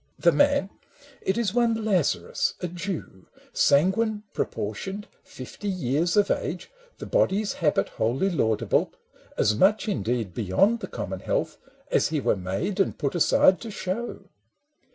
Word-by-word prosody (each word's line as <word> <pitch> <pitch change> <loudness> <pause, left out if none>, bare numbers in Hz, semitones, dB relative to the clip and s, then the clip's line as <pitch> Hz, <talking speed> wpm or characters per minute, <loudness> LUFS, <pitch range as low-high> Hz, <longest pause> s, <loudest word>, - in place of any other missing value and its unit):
The - - +4
man 285 -9 +2 0.3
— 285 -1 -23
it 190 - 0
is 220 -5 0
one 230 -2 +1
Lazarus 185 -8 0
a 180 - -3
Jew, 175 - -6 0.3
Sanguine, 210 +8 +2
proportioned, 190 - -4 0.2
fifty 130 +10 -9
years 170 -1 0
of 205 -1 +4
age, - - -3 0.3
The - - -7
body's 215 - +1
habit 150 - +1
wholly 130 - 0
laudable, 110 -10 +1 0.4
As 105 - +3
much, 205 - +3
indeed, 115 - -1
beyond 120 - +2
the - - -6
common - - -5
health - - -2 0.3
As - - +3
he 155 -1 -1
were - - +1
made 95 - -3
and 195 - +1
put 140 -3 -1
aside 180 +2 +4
to 230 - -6
show. 205 +3 -4
190 Hz, 145 wpm, -25 LUFS, 135-215 Hz, 0.4 s, The